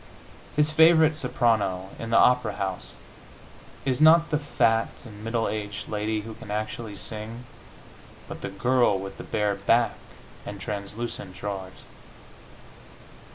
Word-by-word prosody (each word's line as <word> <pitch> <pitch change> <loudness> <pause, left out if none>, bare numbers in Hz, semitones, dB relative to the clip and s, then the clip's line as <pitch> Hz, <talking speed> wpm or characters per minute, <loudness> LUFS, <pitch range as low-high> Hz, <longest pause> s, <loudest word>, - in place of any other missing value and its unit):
His 150 +1 +3
favorite 160 0 +6
soprano, 110 -9 0
in 115 - -5
the 115 - +4
opera 125 -4 +4
house, 95 -2 -4 0.9
is 130 +1 0
not 165 +2 +6
the 150 - +2
fat 115 -6 +2 0.2
and 105 -2 -11
middle 115 0 0
aged 105 -1 -4
lady 105 0 -1
who 110 +1 -8
can 110 -1 -12
actually 110 +1 -4
sing, 110 +4 -6 0.8
but - - -8
the - - -4
girl 120 +1 +2
with 95 0 -7
the - - -6
bare 105 -1 0
back 110 +3 +2 0.5
and 100 -1 -7
translucent 105 +1 -5
drawers. 95 -2 -6
110 Hz, 130 wpm, -26 LUFS, 100-125 Hz, 0.9 s, favorite